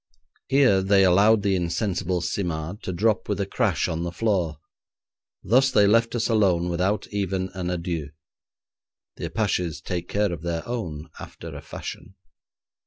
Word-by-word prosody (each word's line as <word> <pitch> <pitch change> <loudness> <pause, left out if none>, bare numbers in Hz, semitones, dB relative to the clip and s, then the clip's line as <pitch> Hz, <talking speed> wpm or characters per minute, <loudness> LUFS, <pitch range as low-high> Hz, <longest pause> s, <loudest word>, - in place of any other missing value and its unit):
Here 130 -8 +4
they 95 0 +4
allowed 100 +4 +5
the 100 -2 +2
insensible 90 0 -1
Simard 85 +1 -3
to - - -4
drop 105 +4 +1
with 105 - -1
a 100 - 0
crash - - 0
on 80 0 -2
the 85 0 -3
floor, 90 -6 0 0.9
thus 130 +6 +4
they 105 -6 +4
left 115 +3 +3
us 115 - +1
alone 95 -6 +2
without 95 +4 0
even 95 -2 -1
an 90 -1 -3
adieu. 85 -4 -3 1.1
The - - -4
Apaches 90 -7 -1
take 85 +1 -4
care 105 -2 +1
of 80 - -6
their 85 -1 -3
own 85 -10 -5
after - - -9
a - - -7
fashion. 95 - -8
95 Hz, 155 wpm, -25 LUFS, 85-105 Hz, 1.1 s, allowed